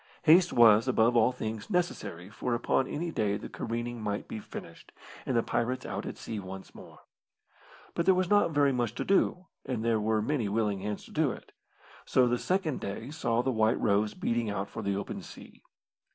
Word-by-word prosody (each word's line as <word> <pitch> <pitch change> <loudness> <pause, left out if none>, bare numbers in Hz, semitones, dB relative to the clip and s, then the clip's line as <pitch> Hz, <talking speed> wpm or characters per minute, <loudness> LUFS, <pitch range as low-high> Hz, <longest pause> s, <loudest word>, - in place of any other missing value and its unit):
Haste 170 +3 +6
was, 115 0 +6
above 120 -1 +3
all 115 +2 +5
things, 110 -3 -5
necessary, 105 - -2
for 120 +4 -2
upon 130 +2 +1
any 165 +5 -3
day 105 -7 0
the - - -8
careening 120 0 -4
might 105 -1 -3
be 110 - -5
finished, - - -10 0.4
and 125 - +1
the 115 - +3
pirates 125 +2 -1
out - - -4
at - - -6
sea 110 - -5
once 95 0 -9
more. - - -14 0.9
But 170 - -1
there 190 - +6
was 185 0 +1
not 205 0 +4
very 145 -3 +3
much 120 -2 -1
to - - -3
do, 185 -1 +2 0.2
and 115 -3 -3
there 115 -2 +2
were 110 +1 +1
many 125 -5 0
willing 105 -2 0
hands 105 +1 -4
to - - -15
do - - +2
it, - - -10 0.5
so 125 -1 +3
the 120 0 +1
second 180 -6 0
day 100 +7 -5
saw 120 -6 0
the 130 - +1
White 110 0 +2
Rose 105 0 +1
beating 115 -2 -1
out 100 -1 -3
for - - -5
the 100 -1 -1
open 100 - -4
sea. - - -13
115 Hz, 200 wpm, -29 LUFS, 105-135 Hz, 0.9 s, Haste